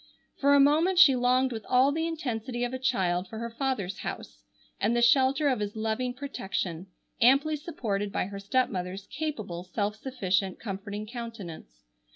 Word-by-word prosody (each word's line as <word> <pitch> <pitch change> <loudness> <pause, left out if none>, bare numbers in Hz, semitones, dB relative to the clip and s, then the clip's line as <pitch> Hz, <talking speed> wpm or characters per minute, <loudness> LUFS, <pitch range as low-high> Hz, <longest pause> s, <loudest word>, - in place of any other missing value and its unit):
For 285 0 +4
a - - +6
moment 315 +7 +4
she 310 -7 +8
longed 255 +1 +2
with 220 -2 -5
all 260 +2 +5
the 320 +2 -1
intensity 245 -6 -3
of 245 +1 -2
a 260 - -3
child 185 -7 0
for 220 - -8
her 235 +1 -4
father's 230 -7 -2
house - - -7 0.4
and 220 +4 +1
the 240 - +2
shelter 265 +4 +4
of 255 -5 +1
his 205 0 -3
loving 220 +3 -2
protection, 195 - -4 0.3
amply 275 +6 +5
supported 210 - -3
by - - -1
her 200 +1 -7
stepmother's 195 -4 -1
capable, 215 - -4
self 205 +3 -2
sufficient, 195 -6 -1
comforting 205 0 -5
countenance. 225 -7 -8
235 Hz, 165 wpm, -28 LUFS, 200-265 Hz, 0.4 s, she